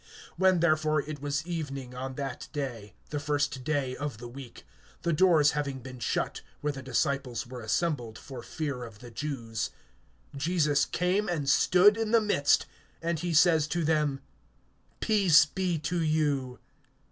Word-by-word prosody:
(19)When 190 -2 +4
therefore 155 -2 +3
it 145 -1 -7
was 145 +1 -2
evening 140 -7 -5
on 130 +1 -5
that 135 -3 -5
day, 120 -9 -5 0.2
the 145 - -1
first 145 -3 -1
day 135 -3 -1
of 145 -4 -4
the 120 +2 -8
week, 125 0 -11 0.4
the 170 -1 +1
doors 155 -3 +5
having 145 -2 -2
been 130 0 -10
shut, - - -1 0.2
where 150 0 -1
the 135 - -7
disciples 130 -1 -1
were 125 0 -8
assembled, 120 -2 -1
for 130 -3 -9
fear 140 -4 -4
of 115 -3 -10
the 120 +2 -12
Jews, 115 -5 -3 0.7
Jesus 150 -1 +2
came 185 +3 0
and 155 -5 -2
stood 185 +8 +5
in 225 -1 -1
the 230 +1 +5
midst; 200 -10 +2 0.3
and 165 -1 -1
he 175 +1 -2
says 160 -1 +5
to 170 +1 -1
them: 150 -3 +1 0.8
Peace 185 -9 +5
be 180 +1 -1
to 165 +3 -2
you. 145 -5 0
145 Hz, 160 wpm, -29 LUFS, 130-165 Hz, 0.8 s, doors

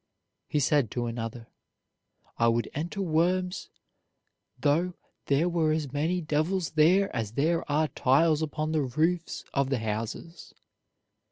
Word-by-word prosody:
He 150 - 0
said 140 -3 +2
to 120 +2 -2
another: 115 0 -5 0.9
"I 115 - +4
would 115 0 +1
enter 170 +7 -3
Worms 180 +2 0 0.9
though 170 +5 +1 0.3
there 145 +5 +2
were 165 -3 +1
as 150 -4 -3
many 165 +5 0
devils 160 +4 -1
there 175 +5 +3
as 110 -3 -3
there 160 +4 0
are 155 +2 +2
tiles 155 +4 +3
upon 155 0 -2
the 155 -1 +1
roofs 160 +6 -1
of 140 -1 +1
the 135 - +1
houses." 115 +10 -5
155 Hz, 135 wpm, -28 LUFS, 130-170 Hz, 0.9 s, I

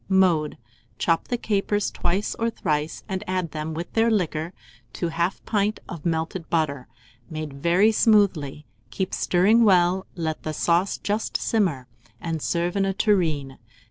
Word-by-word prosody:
Mode. 180 -6 +3 0.4
Chop 165 -1 +1
the 245 - -1
capers 205 -2 0
twice 190 +4 -1
or 230 0 +1
thrice, 150 -7 -2
and 190 +1 -3
add 185 -3 -1
them, 155 0 -4
with 170 +2 -6
their 225 +1 +3
liquor, 170 -6 0 0.4
to 170 -2 -2
1/2 170 +3 -1
pint 210 0 0
of 170 -2 -5
melted 165 +1 -2
butter, 140 -6 0 0.4
made 155 -3 -5
very 175 +9 +3
smoothly; 190 - +2 0.2
keep 185 +12 -3
stirring 205 +6 +4
well; 185 -2 +3
let 160 -3 -3
the 155 - -4
sauce 170 +5 +1
just 210 +2 -1
simmer, 175 - 0 0.3
and 165 -2 -3
serve 170 +3 -1
in 200 - +2
a 195 -1 0
tureen. 160 -11 +1
175 Hz, 150 wpm, -24 LUFS, 155-200 Hz, 0.4 s, stirring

